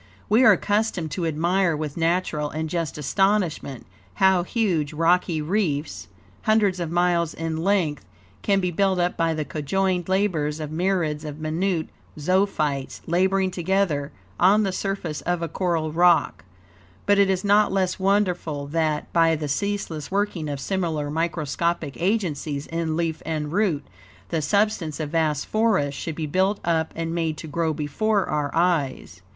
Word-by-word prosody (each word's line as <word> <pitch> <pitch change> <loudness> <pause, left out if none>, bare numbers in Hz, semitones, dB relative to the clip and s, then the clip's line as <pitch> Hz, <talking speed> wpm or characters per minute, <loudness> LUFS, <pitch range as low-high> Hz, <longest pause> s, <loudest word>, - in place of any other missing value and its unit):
We 225 +5 +5
are 220 -4 +8
accustomed 205 -4 -1
to 170 +1 -2
admire, 170 +2 +1
with 150 -2 -4
natural 165 -3 0
and 160 +1 -3
just 165 -4 -2
astonishment, 175 - 0 0.3
how 190 -2 +4
huge, 175 -7 0
rocky 165 0 +2
reefs, 150 - -1 0.4
hundreds 210 -4 +3
of 170 -2 -2
miles 175 -1 +1
in 165 -1 -3
length, 170 -4 0 0.4
can 200 -1 +2
be 180 -2 -1
built 190 +2 +1
up 175 0 0
by 165 -1 +1
the 155 -1 -2
conjoined 180 +4 -1
labors 165 -6 0
of 155 -1 -5
myriads 165 -3 0
of 150 -1 -7
minute 160 +2 -1 0.3
zoophytes, 155 -5 0
laboring 190 +2 +1
together 175 -5 0 0.3
on 200 +4 +5
the 195 - 0
surface 185 -5 -3
of 175 -1 -1
a - - -1
coral 165 -2 -1
rock; 170 - +3 0.6
but 205 0 +4
it 200 -1 +4
is 190 -1 0
not 205 +1 +4
less 190 -1 0
wonderful 180 -7 0
that, 155 0 -1
by 165 -1 +4
the 150 -1 -4
ceaseless 165 -1 -2
working 195 -6 -1
of 140 -1 -4
similar 160 -4 -2
microscopic 165 -1 -1
agencies 160 -8 -1
in 165 -1 -2
leaf 165 -2 -1
and 155 -2 -3
root, 175 -8 +1 0.4
the 160 - -1
substance 180 -2 0
of 150 -2 -3
vast 155 -3 +1
forests 200 -11 +1
should 160 - -4
be 160 - -3
built 190 +6 +1
up 160 -1 +1
and 165 0 -3
made 165 -2 -1
to - - -8
grow 160 +1 -1
before 190 +8 0
our 150 -1 -1
eyes. 150 - 0
170 Hz, 155 wpm, -24 LUFS, 155-190 Hz, 0.6 s, are